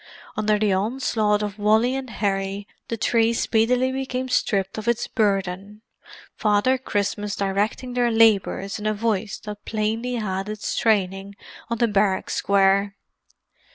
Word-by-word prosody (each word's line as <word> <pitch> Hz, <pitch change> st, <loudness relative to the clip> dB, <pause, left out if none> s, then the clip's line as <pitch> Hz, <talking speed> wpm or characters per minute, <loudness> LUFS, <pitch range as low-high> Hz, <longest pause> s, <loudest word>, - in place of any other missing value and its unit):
Under 215 Hz, 0 st, +1 dB
the 205 Hz, -2 st, +1 dB
onslaught 210 Hz, 0 st, 0 dB
of 205 Hz, 0 st, -5 dB
Wally 220 Hz, +4 st, +3 dB
and 265 Hz, -1 st, -4 dB
Harry 200 Hz, -1 st, -2 dB, 0.2 s
the 230 Hz, -, -3 dB
tree 230 Hz, +1 st, +2 dB
speedily 245 Hz, +3 st, +2 dB
became 260 Hz, -1 st, -3 dB
stripped 195 Hz, -4 st, 0 dB
of 215 Hz, -, -8 dB
its 235 Hz, 0 st, +1 dB
burden; 200 Hz, -1 st, -1 dB, 0.5 s
Father 215 Hz, +5 st, +2 dB
Christmas 205 Hz, -3 st, -2 dB
directing 205 Hz, +6 st, -1 dB
their 245 Hz, -1 st, +2 dB
labours 215 Hz, -3 st, +2 dB
in 210 Hz, -, -3 dB
a 215 Hz, -, 0 dB
voice 210 Hz, -2 st, -1 dB
that 210 Hz, -1 st, -8 dB
plainly 225 Hz, +3 st, -2 dB
had 195 Hz, -3 st, -3 dB
its 215 Hz, -1 st, -4 dB
training 195 Hz, -2 st, 0 dB, 0.3 s
on 235 Hz, -, -1 dB
the 235 Hz, -, +2 dB
barrack 200 Hz, -2 st, +1 dB
square. 200 Hz, 0 st, +2 dB
210 Hz, 140 wpm, -23 LUFS, 200-230 Hz, 0.5 s, Wally